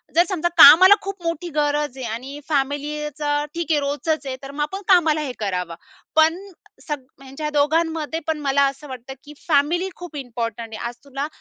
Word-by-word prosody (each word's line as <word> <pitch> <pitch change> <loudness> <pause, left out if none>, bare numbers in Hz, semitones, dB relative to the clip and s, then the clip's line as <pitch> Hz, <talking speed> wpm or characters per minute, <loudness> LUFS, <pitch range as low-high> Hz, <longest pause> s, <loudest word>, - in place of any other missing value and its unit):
जर 345 - +6
समजा 345 -3 0
कामाला 370 +7 +10
खूप 395 -2 -7
मोठी 335 +1 -3
गरज 295 -2 0
आहे 260 - -5
आणि 265 +5 -7
फॅमिलीचं 290 +1 -1
ठीक 335 -1 -2
आहे, 300 - +3
रोजचंच 290 +2 -2
आहे 260 - -3
तर 275 - -7
मग 295 +1 -5
आपण 385 +7 -5
कामाला 325 -5 +4
हे 280 - -3
करावं. 180 -5 -3 0.4
पण 320 +2 +4 0.5
सग 295 -2 -3 0.2
ह्यांच्या 275 +3 -5
दोघांमध्ये 320 +2 0
पण 320 -1 -1
मला 280 0 +2
असं 275 +2 -11
वाटतं, 260 0 -8
की 295 - -12
फॅमिली 335 +5 +2
खूप 355 -3 -10
इम्पॉर्टंट 235 -3 -5
आहे, - - -6
आज 240 - -8
तुला 280 +1 -4
295 Hz, 180 wpm, -22 LUFS, 275-320 Hz, 0.5 s, कामाला